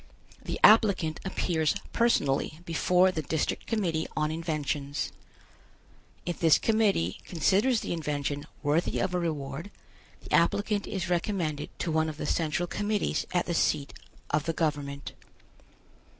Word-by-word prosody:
The - - -4
applicant 200 -7 +5
appears 170 -3 0 0.2
personally 155 - +1
before 180 +3 +3
the 160 - -2
District 155 +1 -2
Committee 175 -8 0
on 155 0 +1
Inventions. 150 -3 -2 1.1
If 175 - -3
this 165 -4 +6
Committee 210 - +1
considers 200 - +2
the - - -3
invention 145 -2 -3 0.2
worthy 150 +4 +1
of 185 -1 0
a 180 - +1
reward, 155 0 -3 0.5
the - - -8
applicant 205 +4 +2
is 190 -2 -3
recommended 170 -4 -1
to 170 - -2
one 160 0 +1
of 150 - -7
the - - -4
Central 160 +2 0
Committees 205 +3 -1
at 175 -1 +1
the 175 - -2
seat 150 -3 +1 0.4
of 150 0 +1
the 165 - 0
government. 145 -3 -2
165 Hz, 135 wpm, -28 LUFS, 150-185 Hz, 1.1 s, this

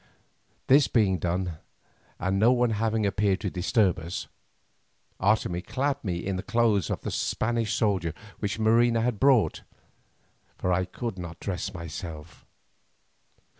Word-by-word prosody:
This 140 +1 +5
being 100 -6 +2
done 90 -1 -2 0.6
and 95 +2 0
no 115 +4 +5
one 125 -2 +2
having 110 0 0
appeared 100 0 +1
to 100 -4 -2
disturb 95 +1 +2
us, 85 +3 -5 0.9
Otomie 95 -3 +1
clad 140 +6 -2
me 90 -5 -1
in 95 -1 -1
the - - -3
clothes 115 -4 +1
of - - -4
a - - -2
Spanish 115 -1 -1
soldier 95 -7 0 0.2
which 100 0 -2
Marina 115 +1 +3
had 115 -3 -1
brought, 135 -5 +3 1.0
for 90 - 0
I 90 +1 +1
could 105 +2 -5
not 85 -2 -7
dress 95 0 -3
myself. 85 -2 -8
100 Hz, 135 wpm, -27 LUFS, 90-115 Hz, 1.0 s, This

